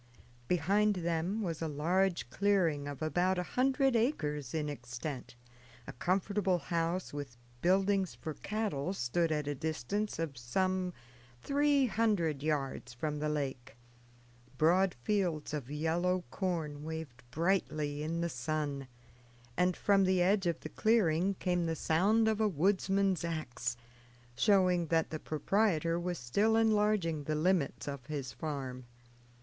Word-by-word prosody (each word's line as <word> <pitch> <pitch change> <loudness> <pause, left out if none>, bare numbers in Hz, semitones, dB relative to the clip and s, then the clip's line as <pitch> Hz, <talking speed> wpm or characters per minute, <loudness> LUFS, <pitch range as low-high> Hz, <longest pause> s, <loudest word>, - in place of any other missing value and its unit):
Behind 200 +5 +2
them 170 +4 -1
was 165 -4 -3
a 165 - -1
large 165 -1 +1
clearing 175 -8 +1
of 145 +1 -5
about 180 +4 +1
a 180 - 0
hundred 270 0 +3
acres 150 - 0
in 155 -2 -1
extent; 125 -1 -6 0.5
a - - -7
comfortable 190 - +1
house, 170 +1 -2
with 140 -4 -6 0.2
buildings 190 +1 +2
for 155 - -5
cattle, 195 -5 -2
stood 165 +2 0
at 150 -1 0
a 145 - 0
distance 160 +8 -2
of 155 -6 -3
some 185 +9 0 0.5
three 285 -1 +3
hundred 200 - +1
yards 140 -5 -2
from 150 +4 -2
the 150 +1 -1
lake; 135 -4 -3 0.8
broad 180 +5 +3
fields 175 -7 0
of 140 -4 -4
yellow 170 +4 0
corn 160 -6 -2
waved 160 -6 -6
brightly 155 -2 0
in 165 +2 -2
the 170 - +1
sun; 145 -1 -3 0.7
and 180 0 +2
from 200 -1 +3
the 185 0 +3
edge 190 +1 +3
of 170 - 0
the 155 - -6
clearing 195 -4 +2
came 180 -2 0
the 165 - -1
sound 200 +9 +3
of 220 0 +1
a 215 - +4
woodsman's 195 +1 +1
ax, 125 -7 -3 0.6
showing 185 - +3
that 160 0 +1
the 155 - -3
proprietor 165 +1 +1
was 175 0 -2
still 200 - +2
enlarging 210 -8 +2
the 155 - -1
limits 160 -3 +1
of 140 -2 -5
his 140 -5 -4
farm. 130 -2 -5
170 Hz, 140 wpm, -32 LUFS, 150-195 Hz, 0.8 s, a